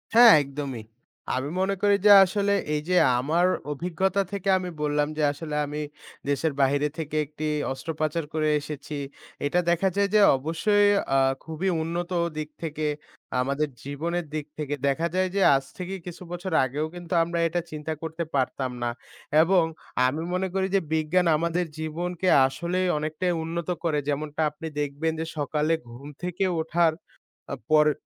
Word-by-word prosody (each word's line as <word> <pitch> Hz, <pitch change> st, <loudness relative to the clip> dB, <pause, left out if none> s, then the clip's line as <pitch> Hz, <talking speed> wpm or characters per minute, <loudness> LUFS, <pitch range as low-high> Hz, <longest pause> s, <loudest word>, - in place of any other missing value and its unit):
হ্যাঁ, 235 Hz, -1 st, +10 dB
একদমই। 140 Hz, -4 st, -6 dB, 0.5 s
আমি 130 Hz, +3 st, -2 dB
মনে 195 Hz, +1 st, +1 dB
করি 205 Hz, 0 st, +4 dB
যে 205 Hz, -, +9 dB
আসলে 200 Hz, +2 st, +1 dB, 0.2 s
এই 150 Hz, -, 0 dB
যে 180 Hz, -, +3 dB, 0.2 s
আমার 160 Hz, +7 st, +2 dB, 0.3 s
অভিজ্ঞতা 180 Hz, +5 st, 0 dB
থেকে 195 Hz, -1 st, -2 dB
আমি 180 Hz, -1 st, -4 dB
বললাম 150 Hz, 0 st, +1 dB
যে 155 Hz, -, +1 dB
আসলে 150 Hz, +1 st, -6 dB
আমি 150 Hz, +1 st, -5 dB, 0.5 s
দেশের 145 Hz, +1 st, 0 dB
বাইরে 140 Hz, +2 st, +3 dB
থেকে 155 Hz, -2 st, -4 dB
একটি 150 Hz, +2 st, -6 dB, 0.3 s
অস্ত্রোপচার 155 Hz, +4 st, -2 dB
করে 155 Hz, -1 st, +1 dB
এসেছি। 150 Hz, 0 st, -7 dB, 0.5 s
এটা 175 Hz, +5 st, +2 dB
দেখা 175 Hz, +3 st, +2 dB
যায় 200 Hz, 0 st, +2 dB
যে -, -, +7 dB, 0.2 s
অবশ্যই 205 Hz, +8 st, +2 dB, 0.3 s
আ -, -, +5 dB, 0.2 s
খুবই 160 Hz, +4 st, -2 dB
উন্নত 170 Hz, +2 st, -3 dB, 0.3 s
দিক 155 Hz, 0 st, -3 dB
থেকে 155 Hz, -1 st, -3 dB, 0.6 s
আমাদের 140 Hz, +4 st, 0 dB, 0.2 s
জীবনের 165 Hz, +5 st, -3 dB
দিক 155 Hz, -2 st, -3 dB
থেকে 150 Hz, -2 st, -3 dB
দেখা 160 Hz, +5 st, +1 dB
যায় 185 Hz, 0 st, +2 dB
যে 200 Hz, -, +2 dB
আজ 135 Hz, -, 0 dB
থেকে 185 Hz, +1 st, -4 dB
কিছু 180 Hz, 0 st, -8 dB
বছর 175 Hz, +1 st, -5 dB
আগেও 145 Hz, +4 st, -2 dB
কিন্তু 175 Hz, 0 st, -6 dB
আমরা 170 Hz, +1 st, -2 dB
এটা 175 Hz, +1 st, -1 dB
চিন্তা 155 Hz, +1 st, -4 dB
করতে 160 Hz, +1 st, -4 dB
পারতাম 130 Hz, -1 st, 0 dB
না। 120 Hz, -, +1 dB, 0.5 s
এবং 175 Hz, +1 st, +4 dB, 0.4 s
আমি 150 Hz, +5 st, -2 dB
মনে 185 Hz, +1 st, 0 dB
করি 190 Hz, 0 st, +1 dB
যে 195 Hz, -, +4 dB
বিজ্ঞান 160 Hz, +3 st, +2 dB
আমাদের 170 Hz, +2 st, 0 dB
জীবনকে 175 Hz, +3 st, -3 dB, 0.2 s
আসলেই 175 Hz, +7 st, -1 dB
অনেকটাই 155 Hz, +4 st, -1 dB
উন্নত 170 Hz, +1 st, -4 dB
করে 155 Hz, -3 st, +1 dB
যেমনটা 150 Hz, +2 st, -2 dB
আপনি 150 Hz, +2 st, -8 dB
দেখবেন 145 Hz, +2 st, -1 dB
যে 160 Hz, -, -2 dB
সকালে 150 Hz, +2 st, 0 dB, 0.2 s
ঘুম 125 Hz, +4 st, -10 dB, 0.2 s
থেকে 180 Hz, +2 st, -2 dB, 0.2 s
ওঠার 165 Hz, +1 st, +2 dB, 0.6 s
আ -, -, -1 dB, 0.2 s
পরে 150 Hz, 0 st, +6 dB
160 Hz, 160 wpm, -26 LUFS, 150-180 Hz, 0.6 s, হ্যাঁ